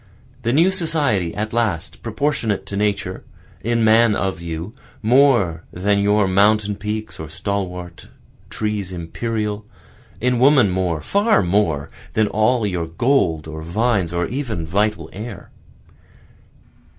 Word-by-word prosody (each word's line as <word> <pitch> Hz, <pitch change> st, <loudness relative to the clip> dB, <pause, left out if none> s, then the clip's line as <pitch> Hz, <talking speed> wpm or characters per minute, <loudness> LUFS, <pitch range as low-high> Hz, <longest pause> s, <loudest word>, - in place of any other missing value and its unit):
The 120 Hz, -1 st, 0 dB
new 165 Hz, +8 st, +4 dB
society 145 Hz, -, +1 dB
at 110 Hz, +1 st, -3 dB
last, 105 Hz, -6 st, -1 dB
proportionate 115 Hz, -4 st, -1 dB
to 100 Hz, -, -5 dB
Nature, 105 Hz, 0 st, -1 dB, 0.4 s
In 115 Hz, 0 st, +1 dB
man 110 Hz, 0 st, +5 dB
of 95 Hz, -4 st, -2 dB
you, 85 Hz, +4 st, -5 dB, 0.3 s
more 115 Hz, -, +3 dB
than 100 Hz, +3 st, +1 dB
your 105 Hz, 0 st, +3 dB
mountain 105 Hz, +2 st, +3 dB
peaks 105 Hz, +1 st, -5 dB
or 80 Hz, -1 st, -6 dB
stalwart 90 Hz, -2 st, -4 dB, 0.4 s
trees 105 Hz, -3 st, -3 dB
imperial, 105 Hz, +4 st, -3 dB, 0.6 s
In 125 Hz, +1 st, +1 dB
woman 130 Hz, -6 st, +5 dB
more, 90 Hz, -4 st, -1 dB
far 200 Hz, -, +2 dB
more, 85 Hz, -6 st, +1 dB, 0.3 s
than 110 Hz, -, +3 dB
all 110 Hz, +2 st, +2 dB
your 90 Hz, -5 st, -2 dB
gold 85 Hz, -, +1 dB
or 80 Hz, 0 st, -7 dB
vines, 95 Hz, +1 st, 0 dB
or 85 Hz, 0 st, 0 dB
even 115 Hz, -, -3 dB
vital 100 Hz, -1 st, 0 dB
air. 105 Hz, 0 st, -8 dB
105 Hz, 125 wpm, -20 LUFS, 90-115 Hz, 0.6 s, man